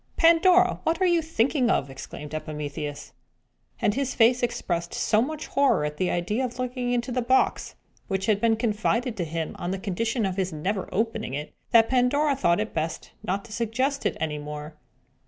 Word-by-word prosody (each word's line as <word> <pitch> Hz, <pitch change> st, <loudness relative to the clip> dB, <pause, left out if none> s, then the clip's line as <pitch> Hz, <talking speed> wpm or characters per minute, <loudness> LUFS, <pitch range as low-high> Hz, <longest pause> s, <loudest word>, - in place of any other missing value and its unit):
"Pandora, 360 Hz, +2 st, +5 dB
what 325 Hz, +2 st, 0 dB
are 375 Hz, -, +3 dB
you 345 Hz, -2 st, +3 dB
thinking 275 Hz, -4 st, +1 dB
of?" 135 Hz, -, +2 dB
exclaimed 145 Hz, +2 st, -9 dB
Epimetheus. 150 Hz, -1 st, -5 dB, 0.7 s
And 205 Hz, -, +2 dB
his 270 Hz, +2 st, -2 dB
face 240 Hz, +2 st, +4 dB
expressed 175 Hz, -8 st, -2 dB
so 215 Hz, -, +2 dB
much 305 Hz, +4 st, -3 dB
horror 275 Hz, -, +2 dB
at 150 Hz, 0 st, -4 dB
the 185 Hz, -, 0 dB
idea 210 Hz, +8 st, -1 dB
of 245 Hz, -1 st, -4 dB
looking 250 Hz, -1 st, -2 dB
into 245 Hz, +1 st, -1 dB
a 250 Hz, -, +1 dB
box, 255 Hz, +2 st, +1 dB, 0.3 s
which 190 Hz, -1 st, -1 dB
had 210 Hz, -2 st, +2 dB
been 230 Hz, -1 st, +4 dB
confided 225 Hz, +2 st, 0 dB
to 180 Hz, -, -1 dB
him 165 Hz, 0 st, -4 dB
on 175 Hz, -, -3 dB
the 190 Hz, -, -1 dB
condition 220 Hz, +4 st, -1 dB
of 190 Hz, -1 st, -2 dB
his 190 Hz, -1 st, 0 dB
never 185 Hz, +5 st, -3 dB
opening 220 Hz, -, -1 dB
it, 150 Hz, +1 st, -6 dB, 0.2 s
that 225 Hz, -1 st, +6 dB
Pandora 275 Hz, +3 st, +2 dB
thought 175 Hz, -9 st, +2 dB
it 215 Hz, +1 st, -3 dB
best 160 Hz, 0 st, -3 dB
not 195 Hz, +2 st, -2 dB
to 215 Hz, -, -10 dB
suggest 255 Hz, +5 st, 0 dB
it -, -, -3 dB
any 150 Hz, -2 st, -2 dB
more. 150 Hz, +1 st, -7 dB
225 Hz, 190 wpm, -26 LUFS, 170-255 Hz, 0.7 s, that